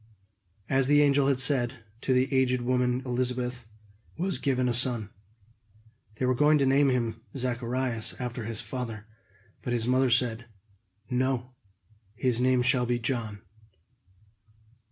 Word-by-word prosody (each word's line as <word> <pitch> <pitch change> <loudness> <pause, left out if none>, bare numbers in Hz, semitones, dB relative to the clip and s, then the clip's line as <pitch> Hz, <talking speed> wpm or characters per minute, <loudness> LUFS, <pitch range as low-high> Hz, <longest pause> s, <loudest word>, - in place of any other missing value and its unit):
As 135 -1 +2
the 145 +1 +5
angel 140 -1 +3
had 140 -2 +2
said, 130 -2 +2 0.3
to - - -1
the 130 +2 +2
aged 125 -2 +2
woman 125 0 0
Elizabeth 125 -1 -2 0.5
was 185 +2 0
given 130 -3 0
a 120 - +1
son. 120 -4 +2 1.0
They 130 - -2
were 130 - +2
going 150 +4 +4
to 140 - +2
name 135 +1 +4
him 115 -3 -1 0.2
Zacharias, 125 -2 -2
after 125 -2 -4
his 115 -1 -3
father. 115 -5 -6 0.6
But 120 - -3
his 115 -1 0
mother 130 +1 +3
said: 120 -1 +1 0.7
"No, 125 0 -1 0.6
his 125 0 0
name 130 -1 +3
shall 125 0 +2
be 120 0 +1
John." 115 -5 -4
125 Hz, 135 wpm, -27 LUFS, 120-130 Hz, 1.0 s, the